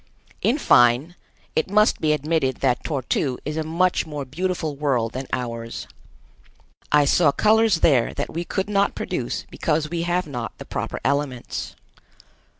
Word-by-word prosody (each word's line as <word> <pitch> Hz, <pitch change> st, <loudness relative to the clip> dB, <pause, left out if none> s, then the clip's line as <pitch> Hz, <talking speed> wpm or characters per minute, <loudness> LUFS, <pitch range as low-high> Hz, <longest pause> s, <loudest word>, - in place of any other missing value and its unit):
In 245 Hz, -, +2 dB
fine, 125 Hz, -, +4 dB, 0.4 s
it 160 Hz, -, +1 dB
must 210 Hz, +2 st, +3 dB
be 155 Hz, -, +2 dB
admitted 150 Hz, -2 st, 0 dB
that 125 Hz, -3 st, +1 dB
Tor 140 Hz, -5 st, -2 dB
tu 125 Hz, 0 st, -1 dB
is 150 Hz, +1 st, -3 dB
a 160 Hz, -, -1 dB
much 170 Hz, +2 st, +1 dB
more 145 Hz, -2 st, -5 dB
beautiful 160 Hz, +1 st, -2 dB
world 130 Hz, -6 st, 0 dB
than 130 Hz, +1 st, -5 dB
ours. 115 Hz, -2 st, -4 dB, 1.1 s
I 150 Hz, -1 st, +5 dB
saw 145 Hz, +1 st, +4 dB
colors 215 Hz, -1 st, +3 dB
there 130 Hz, -7 st, +4 dB
that 145 Hz, -, -4 dB
we 170 Hz, +2 st, -2 dB
could 190 Hz, +2 st, -2 dB
not 200 Hz, -1 st, +1 dB
produce -, -, -3 dB
because 155 Hz, -1 st, -1 dB
we 170 Hz, -1 st, -1 dB
have 175 Hz, +1 st, 0 dB
not 125 Hz, -6 st, -6 dB
the -, -, -9 dB
proper -, -, -4 dB
elements. 140 Hz, -3 st, -2 dB
150 Hz, 155 wpm, -23 LUFS, 130-175 Hz, 1.1 s, I